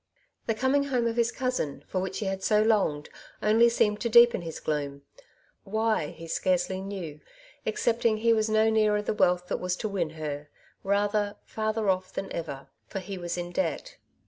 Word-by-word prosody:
The 225 - +1
coming 265 +4 +2
home 250 -4 0
of 230 -1 0
his 235 0 +2
cousin, 205 - -2
for 185 - -2
which 190 - -3
he 215 - -3
had 190 0 -3
BO 210 -1 +4
longed, 195 -10 +1 0.4
only 225 +3 +5
seemed 210 -3 +1
to 235 - 0
deepen 235 -2 +7
his 165 -2 -6
gloom 140 -2 -3 0.3
— - - -36 0.2
why, 220 -5 0
he 165 - -10
scarcely 185 +2 0
knew, 185 -6 -6 0.5
excepting 235 - +1
he 230 +1 +3
was 220 -1 +1
no 220 0 +4
nearer 210 -1 +2
the - - -1
wealth 180 -3 +2
that - - -1
was 180 0 -1
to 215 - -3
win 190 -6 -1
her, 145 -1 -5 0.3
rather, 205 +1 +1
farther 220 0 -2
oflF 185 -1 0
than 195 - -4
ever, 140 -5 -5 0.2
for - - -6
he 190 0 -5
was 175 0 -3
in 175 0 -4
debt. 390 - -2
205 Hz, 190 wpm, -28 LUFS, 175-225 Hz, 0.5 s, deepen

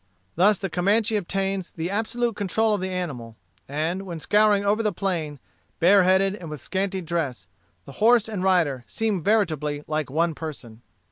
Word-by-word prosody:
Thus 200 +4 +4
the 195 - -3
Comanche 205 +5 +1
obtains 195 -1 -2
the 165 +2 -4
absolute 230 +2 -1
control 215 +2 +1
of 205 - -1
the 190 - -2
animal; 140 -12 -5 0.3
and 160 +6 -2
when 180 -4 -6
scouring 205 +4 +3
over 210 +2 +2
the 215 -2 +1
plain, 170 -6 -3 0.4
bareheaded 190 +2 +4
and 180 -6 -8
with 150 -2 -6
scanty 190 +4 -2
dress, 155 - -3 0.4
the - - -10
horse 230 0 +5
and 205 -4 -4
rider 165 -9 +2
seem 215 -5 -1
veritably 155 -7 0
like 155 -2 -2
one 165 +4 +1
person. 135 -8 -8
185 Hz, 160 wpm, -24 LUFS, 155-205 Hz, 0.4 s, horse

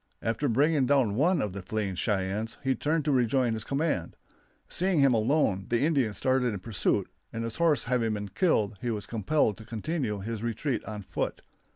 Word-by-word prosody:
After 115 +5 0
bringing 140 +3 +3
down 130 -7 +3
one 160 - +2
of 105 -3 -3
the 100 - -5
fleeing 100 0 -2
Cheyennes 100 +3 -2
he 135 0 +2
turned 155 +2 0
to 150 - +2
rejoin 125 -1 +2
his 110 -1 -3
command. 140 - -1 0.5
Seeing 185 -2 +1
him 135 -2 +5
alone 110 - +1
the 120 -1 +2
Indians 135 -9 +1
started 130 -2 +2
in - - -5
pursuit, 105 +1 0 0.2
and 115 - -4
his 115 -1 -4
horse 165 -3 +3
having 115 -3 0
been 105 -1 -5
killed 105 - +1
he 120 - -2
was 105 -3 -3
compelled 110 0 +1
to 110 - -10
continue 115 +1 -3
his 110 +1 -4
retreat 120 +2 -2
on 105 -2 -6
foot. - - -3
115 Hz, 190 wpm, -28 LUFS, 105-140 Hz, 0.5 s, him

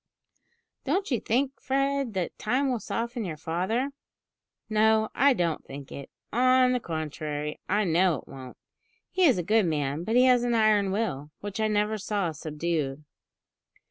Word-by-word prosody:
"Don't 360 +5 -1
you 245 - +2
think, 265 +4 -1
Fred, 275 -3 0
that 180 -2 -2
time 260 +5 +1
will 245 - -1
soften 235 +2 -3
your 165 -6 -5
father?" 190 - -1 0.8
"No, 220 0 +3
I 280 +1 +4
don't 170 -8 -1
think 140 0 -10
it. 140 - -8 0.2
On 255 +1 +4
the 250 - +1
contrary, 150 -4 -4
I 210 +2 +2
know 175 -1 +3
it - - -9
won't. 130 -2 -10 0.5
He 370 0 +3
is 265 - +5
a 175 - -1
good 215 +1 +3
man; 145 0 -1
but 225 +5 -1
he 250 - +6
has 250 -2 +5
an 240 -1 +1
iron 215 -3 +3
will, 190 -9 -2
which 205 0 -5
I 220 - +2
never 210 0 0
saw 200 -4 -1
subdued." 150 -2 -3
210 Hz, 165 wpm, -27 LUFS, 160-245 Hz, 0.8 s, he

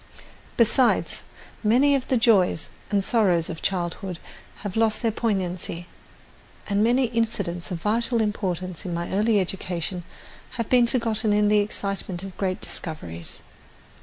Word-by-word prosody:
Besides, 240 +2 +3 0.4
many 255 +7 +5
of 270 -2 0
the 260 - +2
joys 195 - +3 0.2
and 200 -1 +2
sorrows 190 -7 +2
of 165 - -7
childhood 180 0 -2 0.5
have 195 - -3
lost 225 +1 +1
their 225 - +3
poignancy; 185 -6 -2 0.8
and 205 0 +2
many 245 +3 +4
incidents 220 -7 -2
of 175 -3 -4
vital 230 +3 +1
importance 185 -5 -2
in 175 -3 -3
my 170 0 -3
early 210 +2 +3
education 180 -1 -3 0.5
have 230 -2 -2
been 245 -2 +6
forgotten 225 -4 0
in 210 0 +3
the 210 0 +5
excitement 195 -3 -3
of 195 -1 -8
great 185 -2 -1
discoveries. 85 - -7
205 Hz, 135 wpm, -25 LUFS, 180-230 Hz, 0.8 s, been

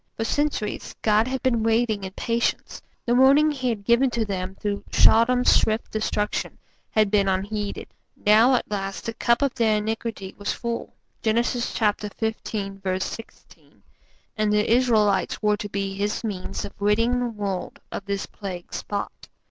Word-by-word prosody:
For 225 - -1
centuries 280 -4 -2
God 215 +1 +3
had 265 0 -3
been 240 -4 +2
waiting 225 -2 +1
in 190 - -5
patience; 230 +3 -1 0.2
the 240 - +2
warning 275 +5 +6
He 260 -3 -2
had 215 -4 -3
given 235 +5 +4
to 235 -2 -1
them 190 -2 -4
through 205 0 -3
Sodom's 245 +3 +5
swift 220 +1 +2
destruction 210 -1 -2 0.3
had 215 -2 +2
been 200 -2 +3
unheeded; 200 +2 -2 0.4
now 225 +5 +6
at 240 - -2
last 195 -1 -3
the 230 - -3
cup 235 +4 +2
of 275 - +1
their 220 -2 +2
iniquity 215 -2 -4
was 205 - -1
full 235 -1 -4 0.3
(Genesis 235 +2 0
xv. 205 -3 -2
16) 225 - -11 0.5
and 215 -1 +1
the 210 +2 +3
Israelites 215 -6 +2
were 210 -1 +2
to 205 - -6
be 195 -1 -2
His 205 +3 -2
means 200 -5 -4
of - - -9
ridding 230 +4 +2
the 245 -1 -1
world 200 -4 -4
of 195 - -5
this 200 -1 -2
plague 185 -4 -8
spot. 205 -1 -5
215 Hz, 155 wpm, -24 LUFS, 200-235 Hz, 0.5 s, warning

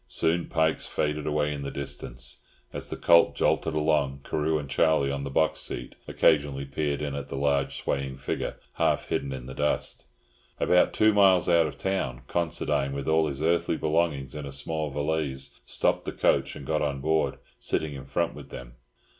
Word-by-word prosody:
Soon 80 +7 +1
Pike's 80 -2 +1
faded 75 0 -1
away 75 -1 +1
in 70 - -5
the 70 - -4
distance. 60 -3 -5 0.3
As - - -5
the - - -4
coach 85 0 +5
jolted 80 - +1
along, 75 -3 +1
Carew 80 +1 0
and 75 -2 -5
Charlie 70 0 +2
on 70 0 -3
the 70 - -4
box 80 +3 +1
seat - - -4
occasionally 70 -2 +2
peered 70 +1 -2
in 70 -1 -2
at 70 -1 -5
the 70 - -6
large 70 0 +1
swaying 70 -1 -2
figure, 70 - -3 0.2
half - - +1
hidden 70 - -1
in 65 -2 -6
the 65 - -7
dust. 75 +2 -1 0.5
About 90 - +4
two 110 0 +4
miles 95 -4 +5
out 85 -2 +4
of - - -8
town 80 -11 -2
Considine, 75 -5 -1
with 70 -1 -4
all 80 0 +3
his 70 +1 -4
earthly 85 0 +2
belongings 75 -4 0
in 75 -2 -5
a - - -6
small 75 +2 -1
valise, 70 -2 -2
stopped - - +1
the - - -2
coach - - +1
and 70 - -9
got 75 +3 0
on 70 -2 -1
board, 80 +3 +1 0.2
sitting 75 -2 -1
in 70 0 -8
front - - -1
with - - -11
them. 60 -1 -9
75 Hz, 190 wpm, -27 LUFS, 70-80 Hz, 0.5 s, coach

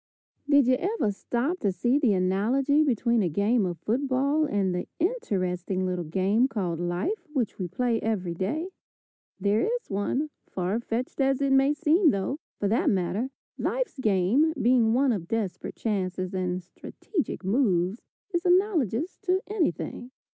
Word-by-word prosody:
Did 285 -2 +6
you 255 +1 +3
ever 385 - 0
stop 250 - -2
to 200 - +1
see 240 +10 +1
the 245 -8 +3
analogy 235 +11 +2
between 235 -4 +2
a 180 - +1
game 200 +5 +2
of 175 -1 -4
football 270 - +1
and 200 -9 0
the 180 - -3
interesting 185 - -1
little 180 -1 -2
game 195 +9 +2
called 185 -9 -2
life 255 - -2
which 245 -8 -1
we 185 - -2
play 230 +5 0
every 190 -6 -1
day? 235 - -2 0.7
There 205 +3 +2
is 480 - -2
one, 255 +10 -1 0.2
far 185 +4 -2
fetched 240 +4 -3
as 270 -1 +2
it 275 -1 +1
may 270 +2 +4
seem, 330 +3 +4
though, 200 +6 -1 0.2
for 205 - 0
that 225 +4 +2
matter, 195 +6 0 0.3
life's - - -2
game, 220 - +3
being 235 -2 +3
one 270 +1 +3
of 185 -7 -3
desperate 215 -4 -3
chances 185 -3 -2
and 180 -1 -2
strategic 300 - -5
moves, 195 -2 +1 0.3
is 345 0 0
analogous 355 - +1
to 370 0 +3
anything. 255 - -2
225 Hz, 155 wpm, -27 LUFS, 190-285 Hz, 0.7 s, Did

